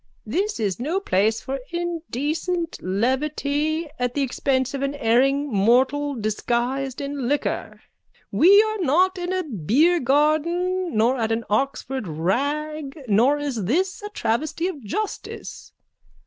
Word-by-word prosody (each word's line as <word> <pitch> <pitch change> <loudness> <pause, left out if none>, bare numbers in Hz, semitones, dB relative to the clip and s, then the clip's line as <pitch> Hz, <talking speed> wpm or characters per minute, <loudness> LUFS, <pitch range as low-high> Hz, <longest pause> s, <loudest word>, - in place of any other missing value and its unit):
_ - - -51 0.2
This 410 +4 -1
is 205 -3 -1
no 315 +10 -1
place 220 - +1
for 270 +1 -4
indecent 335 0 -2
levity 285 - 0
at 245 0 -1
the 285 - +1
expense 260 0 0
of 275 - -3
an 275 +1 -1
erring 275 +3 +2
mortal 260 +8 +3
disguised 240 +4 -1
in 280 -3 -3
liquor. 290 +2 -2 0.5
We 400 +6 +7
are 435 -1 -2
not 365 +4 +2
in 355 0 -3
a 370 0 0
beargarden 310 - +1
nor 235 +4 +3
at 225 -1 0
an 225 +1 0
Oxford 270 0 -1
rag 280 - -2
nor 235 +8 +4
is 275 -9 -3
this 370 - 0
a 415 - -6
travesty 310 - -1
of 300 -9 -6
justice. 420 - -5
280 Hz, 135 wpm, -23 LUFS, 240-330 Hz, 0.5 s, We